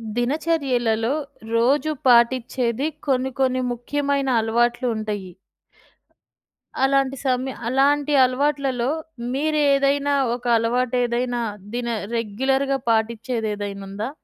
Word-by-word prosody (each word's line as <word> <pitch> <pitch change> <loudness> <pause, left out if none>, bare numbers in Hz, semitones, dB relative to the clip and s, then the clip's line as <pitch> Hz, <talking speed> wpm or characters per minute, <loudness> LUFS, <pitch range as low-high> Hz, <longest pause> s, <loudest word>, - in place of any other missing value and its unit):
దినచర్యలలో 250 -4 0 0.4
రోజు 280 +7 +2 0.2
పాటిచ్చేది 245 +1 +3 0.2
కొన్ని, 265 -1 +1
కొన్ని 255 -1 +2
ముఖ్యమైన 280 +2 -1
అలవాట్లు 240 +3 +1
ఉంటాయి. 210 -4 -4 1.5
అలాంటి 275 0 +1
సమయ 260 0 0 0.2
అలాంటి 285 +3 +2
అలవాట్లలో 265 -1 0 0.4
మీరేదైనా 285 -1 +2 0.2
ఒక 245 0 -12
అలవాటేదైనా 245 +1 0 0.3
దిన 245 0 -2 0.3
రెగ్యులర్‌గా 265 +5 0
పాటిచ్చేదేదైనా 220 -3 -2
ఉందా? 205 +5 -4
255 Hz, 80 wpm, -22 LUFS, 235-275 Hz, 1.5 s, పాటిచ్చేది